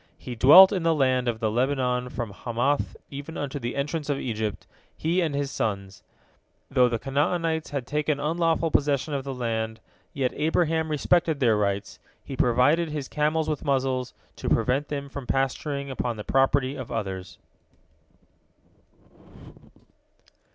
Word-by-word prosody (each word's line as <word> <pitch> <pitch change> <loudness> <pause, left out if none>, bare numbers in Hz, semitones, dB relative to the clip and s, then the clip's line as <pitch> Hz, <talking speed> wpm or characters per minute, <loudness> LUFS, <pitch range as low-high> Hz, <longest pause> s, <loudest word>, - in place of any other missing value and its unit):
He 125 - -7
dwelt 150 - +9
in 190 -3 -1
the 165 -1 +2
land 130 -3 +2
of 115 -2 -1
the 110 -2 0
Lebanon 125 0 0
from 120 -4 -5
Hamath 120 +7 -1
even 145 +4 -7
unto 145 0 -4
the 120 -1 -4
entrance 145 +2 -3
of 145 - +1
Egypt, 110 -5 -3 0.3
he 170 +4 +1
and 155 -4 -1
his 140 -1 -2
sons. 100 -2 -3 0.7
Though 125 -2 +4
the 115 - -1
Canaanites 160 +5 -1
had 140 -3 -3
taken 150 +2 -1
unlawful 165 +1 0
possession 145 +1 +1
of 140 -1 -2
the 135 0 -5
land, 110 -2 -2 0.3
yet 130 -3 -1
Abraham 160 +1 +1
respected 155 +1 +1
their 120 -5 +3
rights; 100 -1 -2 0.2
he 135 - -7
provided 130 +8 +3
his 150 -3 -4
camels 155 +1 0
with 155 -2 -2
muzzles, 130 -2 -1 0.2
to - - -3
prevent 125 +6 +1
them 140 -1 -4
from 140 -2 -8
pasturing 140 +1 -1
upon 120 -3 -3
the 105 - -5
property 135 +1 +2
of 130 -4 -7
others. 95 -5 -4
135 Hz, 150 wpm, -26 LUFS, 120-150 Hz, 0.7 s, dwelt